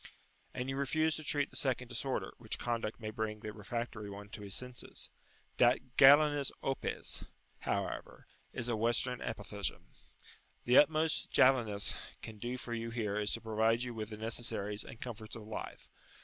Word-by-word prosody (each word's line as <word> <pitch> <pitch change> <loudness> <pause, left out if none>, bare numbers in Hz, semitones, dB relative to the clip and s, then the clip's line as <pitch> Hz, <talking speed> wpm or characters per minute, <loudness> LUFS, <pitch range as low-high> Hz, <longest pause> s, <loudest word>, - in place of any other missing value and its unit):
And 125 - -3
you 135 0 -2
refuse 155 +3 +2
to 155 - -6
treat 145 -1 +1
the - - -11
second 130 -2 0
disorder, 130 +2 -2
which 110 -2 -3
conduct 115 -2 -2
may 110 -2 -4
bring 110 -1 -3
the 105 -2 -5
refractory 110 0 -4
one 100 +1 -8
to 110 0 -8
his 100 -1 -4
senses. 125 -1 -6 0.5
"Dat 120 0 +7 0.2
Galenus 145 +1 +7
opes," 135 0 -2 0.4
however, - - -3 0.3
is 120 - -3
a 120 - +1
Western 120 +3 +1
apothegm: 105 -2 -3 0.8
the 125 +1 +8
utmost 155 +1 +3
"Jalinus" 115 -6 +4 0.3
can 110 -2 -8
do 120 +3 -3
for 120 -1 -5
you 115 0 -2
here 110 -4 -1
is 105 -1 0
to - - -2
provide 110 +1 +2
you 125 -1 -4
with 110 -1 -4
the 105 - -6
necessaries 110 -2 -2
and 115 - -10
comforts 110 -3 -6
of 110 - -7
life. 110 - -6
115 Hz, 165 wpm, -34 LUFS, 110-130 Hz, 0.8 s, the